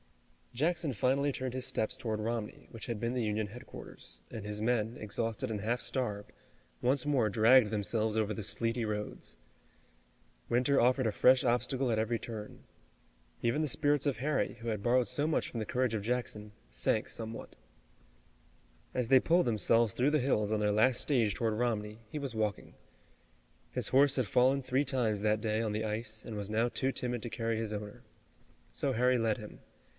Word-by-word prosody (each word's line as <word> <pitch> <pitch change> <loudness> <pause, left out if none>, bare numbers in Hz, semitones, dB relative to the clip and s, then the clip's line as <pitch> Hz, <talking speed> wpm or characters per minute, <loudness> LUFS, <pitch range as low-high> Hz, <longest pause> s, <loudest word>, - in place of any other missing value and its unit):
Jackson 160 +4 0
finally 135 +5 +1
turned 130 -2 -4
his 130 -1 -2
steps 110 +3 -1
toward 115 -5 -3
Romney, 110 0 -4
which 115 - -7
had 115 -3 -3
been 115 +2 -1
the 125 -2 0
Union 105 0 -1
headquarters, 120 +5 -10
and 110 -3 -6
his 105 0 -5
men, 115 0 0
exhausted 115 +4 -3
and 105 -2 -3
half 120 +4 0
starved, 105 -8 -3 0.5
once 130 +3 +2
more 135 -7 +2
dragged 115 +2 +5
themselves 110 +1 0
over 110 -1 +1
the 110 - -5
sleety 115 +3 -1
roads. 105 - -5 1.1
Winter 125 +4 +3
offered 125 0 +3
a - - +1
fresh 130 +4 +5
obstacle 125 +2 +1
at 110 -2 +1
every 115 +1 0
turn. 110 -3 -8 0.8
Even 120 +6 +1
the 155 - +1
spirits 145 +1 +1
of 140 -3 0
Harry, 145 +4 0
who 115 - -9
had 105 -2 -3
borrowed 125 0 +3
so 145 - 0
much 155 - 0
from 115 - -5
the 110 - -2
courage 125 +1 0
of 110 - -1
Jackson, 110 -2 -3 0.2
sank - - +1
somewhat. 115 0 -6 1.4
As 125 -2 -1
they 130 +2 +7
pulled 175 +2 +3
themselves 115 0 +2
through 130 +4 +2
the 155 - +3
hills 110 -6 +1
on 110 - +1
their 105 0 +2
last 120 +4 +4
stage 115 -8 +1
toward 115 -2 0
Romney, 110 -2 -2
he 150 - -4
was 135 -5 -4
walking. 105 -2 -2 1.0
His - - -1
horse 140 +1 +5
had 130 -5 +1
fallen 130 +6 +3
three 130 +2 +1
times 120 -7 0
that 105 0 +1
day 110 -1 0
on 110 -2 -1
the 110 +1 -1
ice, 110 0 -3
and 115 - -6
was 100 -1 -5
now 110 +2 +2
too 130 +2 -1
timid 125 -2 -2
to 120 - -4
carry 115 0 -2
his 110 -1 -3
owner. 105 -1 -6 0.7
So 140 - -1
Harry 125 +1 +3
led 115 0 +1
him. 105 -3 -10
115 Hz, 185 wpm, -32 LUFS, 110-130 Hz, 1.4 s, they